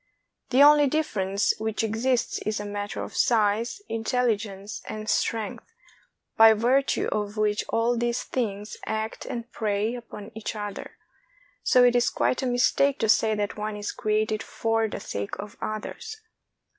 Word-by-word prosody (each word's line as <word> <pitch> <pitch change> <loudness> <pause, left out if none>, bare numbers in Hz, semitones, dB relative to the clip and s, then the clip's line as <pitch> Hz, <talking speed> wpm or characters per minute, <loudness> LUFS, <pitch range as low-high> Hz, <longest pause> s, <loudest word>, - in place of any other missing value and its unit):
The 260 +2 +6
only 295 0 +7
difference 210 -9 0
which 220 0 -1
exists 235 +3 0
is 215 0 -2
a 205 - -5
matter 205 0 -4
of - - -8
size, 225 - +1
intelligence, 220 -3 -2
and 215 0 -6
strength, 225 - -2 0.6
by 225 0 +8
virtue 250 +5 +2
of 210 0 -2
which 210 0 +1
all 230 +2 +1
these 240 +1 -1
things 210 -4 -3
act 220 0 -3
and 235 0 -5
prey 210 +1 -1
upon 230 -3 -9
each 220 0 -5
other; 205 -1 -6 0.6
so 250 -2 +5
it 245 0 +5
is 245 - +3
quite - - 0
a 260 - -1
mistake 255 +3 +2
to 225 - 0
say 220 0 +4
that 205 0 -2
one 210 0 -3
is 205 0 -3
created 215 0 0
for 225 0 0
the 205 - -5
sake 100 - -5
of 205 0 -7
the - - -3
others. 435 - -6
220 Hz, 155 wpm, -26 LUFS, 210-245 Hz, 0.6 s, by